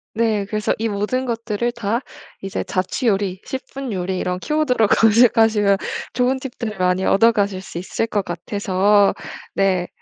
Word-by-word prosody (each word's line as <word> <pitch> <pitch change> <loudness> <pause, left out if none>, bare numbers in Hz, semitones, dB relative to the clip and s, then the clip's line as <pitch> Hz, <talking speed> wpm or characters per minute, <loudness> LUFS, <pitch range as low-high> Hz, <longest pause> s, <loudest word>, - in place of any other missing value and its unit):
네 220 -3 +1
그래서 215 +1 -1
이 225 0 0
모든 210 +6 -1
것들을 230 -1 -2
다 230 0 -1 0.4
이제 195 0 -3
자취 185 +7 -2
요리 195 -3 0
10 265 - -4
분 270 -4 -4
요리 185 0 -2
이런 180 0 -2
키워드로 255 -3 +1
검색하시면 220 -2 +4 0.4
좋은 255 +2 +1
팁들을 235 -5 -6
많이 180 +1 +1
얻어 230 +3 +5
가실 200 -4 -1
수 190 - -9
있을 190 +5 -2
것 205 -3 -1
같아서 200 +3 +2 0.4
네. 185 -2 +1
210 Hz, 300 characters per minute, -20 LUFS, 195-230 Hz, 0.4 s, 얻어